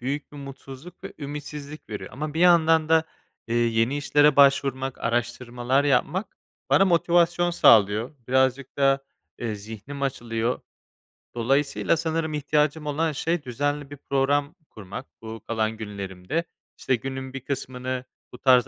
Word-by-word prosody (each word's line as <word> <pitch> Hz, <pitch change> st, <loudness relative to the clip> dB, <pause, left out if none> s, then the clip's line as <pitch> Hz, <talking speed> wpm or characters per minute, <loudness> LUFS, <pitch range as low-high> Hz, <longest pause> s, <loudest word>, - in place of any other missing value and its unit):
büyük 140 Hz, +4 st, -4 dB
bir 145 Hz, -, -10 dB
mutsuzluk 135 Hz, +3 st, -10 dB
ve -, -, -6 dB
ümitsizlik 145 Hz, +1 st, -7 dB
veriyor. 105 Hz, -, -6 dB
Ama 150 Hz, +2 st, -5 dB
bir 165 Hz, -, -1 dB
yandan 165 Hz, -3 st, +5 dB
da, 160 Hz, 0 st, +4 dB, 0.4 s
eee, 115 Hz, -, -2 dB
yeni 115 Hz, +3 st, +2 dB
işlere 145 Hz, 0 st, +3 dB
başvurmak, 135 Hz, -2 st, +3 dB
araştırmalar 120 Hz, +3 st, 0 dB
yapmak 145 Hz, -, 0 dB, 0.3 s
bana 195 Hz, -, +6 dB
motivasyon 175 Hz, 0 st, +3 dB
sağlıyor. 110 Hz, -, +5 dB, 0.2 s
Birazcık 130 Hz, 0 st, +1 dB
da, 135 Hz, -1 st, +3 dB, 0.3 s
eee, 115 Hz, -3 st, -3 dB
zihnim 110 Hz, +7 st, -8 dB
açılıyor. 120 Hz, -3 st, -1 dB, 0.8 s
Dolayısıyla 140 Hz, +6 st, +1 dB
sanırım 160 Hz, -1 st, -1 dB
ihtiyacım 150 Hz, +1 st, 0 dB
olan 155 Hz, +2 st, 0 dB
şey 165 Hz, +2 st, -1 dB
düzenli 145 Hz, +3 st, -2 dB
bir 145 Hz, -, -9 dB
program 140 Hz, +3 st, 0 dB
kurmak 105 Hz, +4 st, -8 dB, 0.2 s
bu 110 Hz, -1 st, -8 dB
kalan 110 Hz, -1 st, -1 dB
günlerimde. 100 Hz, -, -4 dB, 0.3 s
İşte, 130 Hz, -, +1 dB
günün 130 Hz, +1 st, -6 dB
bir 135 Hz, -, -4 dB
kısmını 130 Hz, -1 st, -4 dB, 0.3 s
bu 125 Hz, -, -8 dB
tarz 125 Hz, -3 st, +4 dB
135 Hz, 135 wpm, -25 LUFS, 120-150 Hz, 0.8 s, bana